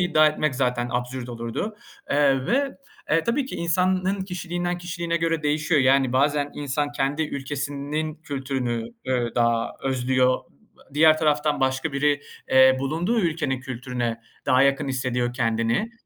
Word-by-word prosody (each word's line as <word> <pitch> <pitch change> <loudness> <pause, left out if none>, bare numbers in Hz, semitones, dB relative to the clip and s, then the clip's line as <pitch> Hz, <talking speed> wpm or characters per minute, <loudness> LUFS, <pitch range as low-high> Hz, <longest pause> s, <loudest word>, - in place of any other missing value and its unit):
iddia 160 -3 +4
etmek 155 -2 0
zaten 125 -2 0
absürt 125 0 -3
olurdu. 120 - -4 0.3
Eee, 140 -2 +3
ve 275 +2 0 0.5
tabii 260 +3 +1
ki - - -7
insanın 185 +3 +1
kişiliğinden 175 -1 -3
kişiliğine 170 -1 -3
göre 165 -1 0
değişiyor. 150 +1 +2
Yani, 135 -1 +3
bazen 145 +2 +2
insan 145 +1 -2
kendi 145 +2 0
ülkesinin 145 +1 -3
kültürünü, 130 -6 -3 0.2
eee, 125 -2 0
daha 115 -1 +1
özlüyor, 130 -1 +2
ııı, 70 - -24
diğer 155 +1 +6
taraftan 150 -2 +1
başka 130 +3 0
biri, 145 +1 +2 0.3
eee, 130 0 +6
bulunduğu 165 - 0
ülkenin 155 -7 -1
kültürüne 125 -2 -4 0.3
daha 130 +1 +5
yakın 140 +1 +2
hissediyor 125 -2 -1
kendini. 115 - 0
140 Hz, 135 wpm, -24 LUFS, 130-160 Hz, 0.5 s, diğer